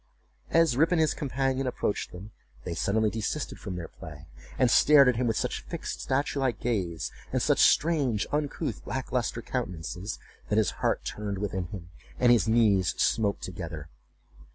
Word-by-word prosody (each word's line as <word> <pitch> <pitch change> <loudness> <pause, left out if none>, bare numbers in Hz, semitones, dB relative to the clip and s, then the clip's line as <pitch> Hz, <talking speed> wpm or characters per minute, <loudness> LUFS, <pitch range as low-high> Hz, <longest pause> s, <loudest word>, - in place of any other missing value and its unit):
As 165 -6 +4
Rip 160 +6 +3
and 175 - +3
his 155 -2 +3
companion 135 -1 -1
approached 115 -4 -2
them, 95 +4 -10 0.3
they 85 - -4
suddenly 105 +5 +1
desisted 115 +7 -3
from 95 -3 -6
their 85 -2 -5
play, 75 -1 -11 0.3
and 125 -3 +3
stared 140 +1 +7
at 125 - +3
him 125 0 +1
with 115 - 0
such - - -2
fixed - - -6
statue 140 +1 -1
like 130 -5 0
gaze, 95 -9 -2 0.2
and - - +1
such - - +2
strange, 140 -10 +3
uncouth, 145 -1 -2
lack - - -4
lustre - - -1
countenances, 90 +4 -4 0.3
that 105 - +1
his 110 -3 +3
heart - - 0
turned 105 -2 -4
within 95 -2 -2
him, 85 -1 -9 0.3
and 120 -1 +5
his 115 -3 +4
knees 105 -5 +3
smote 105 -3 +1
together. 80 -4 -6
110 Hz, 170 wpm, -28 LUFS, 95-135 Hz, 0.3 s, stared